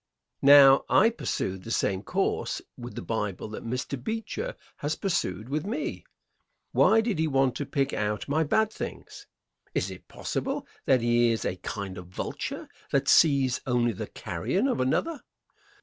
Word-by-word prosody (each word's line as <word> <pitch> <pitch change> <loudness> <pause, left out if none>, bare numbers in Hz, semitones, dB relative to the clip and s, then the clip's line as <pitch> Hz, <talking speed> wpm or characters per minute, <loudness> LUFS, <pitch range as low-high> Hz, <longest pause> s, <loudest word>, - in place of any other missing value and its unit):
Now, 140 -1 +8
I 220 +4 +5
pursued 95 - -3
the - - -8
same 95 -4 0
course - - -1 0.2
with 120 0 -9
the - - -5
Bible 105 -4 -3
that 110 - -7
Mr. 125 +2 -4
Beecher 225 - -3 0.2
has 145 +2 -2
pursued 175 - -2
with 145 +3 -2
me. 235 - -4 0.7
Why 225 0 +5
did 220 -7 -1
he 160 - +2
want 135 -3 +2
to 145 - -4
pick 140 -1 0
out 105 0 -2
my 155 +3 +2
bad 220 +8 +1
things? - - -7 0.5
Is - - 0
it - - -11
possible 275 +1 -3 0.2
that 130 -3 +4
he 120 0 +3
is 115 -1 -1
a 90 - -2
kind 95 0 -5
of 90 - -10
vulture 90 - -5 0.2
that 135 0 +1
sees 140 -5 +4
only 120 -1 +2
the - - -5
carrion 135 - -2
of 265 - 0
another? 295 - 0
135 Hz, 165 wpm, -27 LUFS, 115-180 Hz, 0.7 s, Now